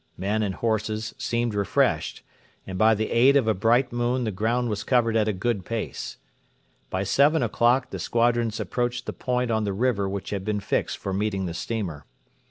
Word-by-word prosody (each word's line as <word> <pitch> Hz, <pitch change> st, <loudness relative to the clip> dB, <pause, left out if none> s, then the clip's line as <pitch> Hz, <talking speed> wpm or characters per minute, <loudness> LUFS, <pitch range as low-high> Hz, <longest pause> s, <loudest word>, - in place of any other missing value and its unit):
Men 105 Hz, +4 st, 0 dB
and 100 Hz, -3 st, -1 dB
horses 110 Hz, -1 st, -1 dB
seemed 120 Hz, -1 st, -1 dB
refreshed, 100 Hz, -1 st, 0 dB, 0.4 s
and 95 Hz, -, -6 dB
by 110 Hz, +3 st, +4 dB
the 110 Hz, +1 st, -2 dB
aid 130 Hz, +4 st, +5 dB
of 135 Hz, -5 st, +3 dB
a 110 Hz, -, +4 dB
bright 115 Hz, +6 st, +2 dB
moon 120 Hz, +1 st, 0 dB
the 110 Hz, -, -1 dB
ground 115 Hz, +5 st, 0 dB
was 105 Hz, -1 st, -2 dB
covered 115 Hz, -3 st, +2 dB
at 110 Hz, -1 st, +3 dB
a -, -, +2 dB
good 105 Hz, +1 st, -1 dB
pace. 115 Hz, +3 st, -4 dB, 0.7 s
By 95 Hz, +1 st, -1 dB
seven 140 Hz, -, +3 dB
o'clock 120 Hz, +3 st, +2 dB
the -, -, -5 dB
squadrons 115 Hz, -1 st, +1 dB
approached 120 Hz, 0 st, -2 dB
the -, -, -4 dB
point 125 Hz, -1 st, -1 dB
on 110 Hz, -1 st, +1 dB
the 100 Hz, -2 st, -1 dB
river 100 Hz, -2 st, 0 dB
which 100 Hz, 0 st, -5 dB
had 100 Hz, -2 st, -2 dB
been 105 Hz, 0 st, -1 dB
fixed 100 Hz, -, -1 dB
for 95 Hz, -, -4 dB
meeting 100 Hz, -1 st, -1 dB
the 85 Hz, -, -4 dB
steamer. 85 Hz, -, -4 dB
110 Hz, 190 wpm, -25 LUFS, 100-120 Hz, 0.7 s, aid